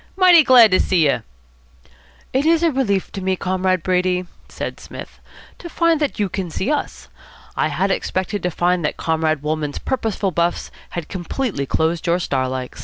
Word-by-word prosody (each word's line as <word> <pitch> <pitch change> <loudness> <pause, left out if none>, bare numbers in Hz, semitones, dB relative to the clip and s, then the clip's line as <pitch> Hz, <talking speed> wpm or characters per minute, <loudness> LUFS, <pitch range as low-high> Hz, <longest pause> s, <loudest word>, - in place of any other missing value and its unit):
Mighty 365 -3 +7
glad 245 -5 +7
to 185 - +4
see 175 -5 +2
you." 140 - +1 1.1
"It 265 +2 +2
is 330 +1 +3
a 335 - +3
relief 210 -9 -1
to 195 - -6
me, 190 0 0
Comrade 185 -1 -1
Brady," 180 0 +1 0.2
said - - -6
Psmith, - - -10 0.4
"to 345 - -8
find 335 -2 +2
that 295 -2 -1
you 205 -2 0
can 185 -1 -4
see 190 - -2
us. 295 - -3 0.5
I - - +1
had - - -1
expected 190 +2 -2
to 180 - 0
find 175 0 0
that 150 - -2
Comrade 160 -2 0
Wolmann's 150 -1 -2
purposeful 220 -6 -2
buffs 170 +1 -1 0.3
had 170 - -4
completely 185 - -3
closed 160 +4 -1
your 170 +1 +3
star 130 -7 -1
likes." 130 -1 -5
185 Hz, 180 wpm, -20 LUFS, 165-240 Hz, 1.1 s, Mighty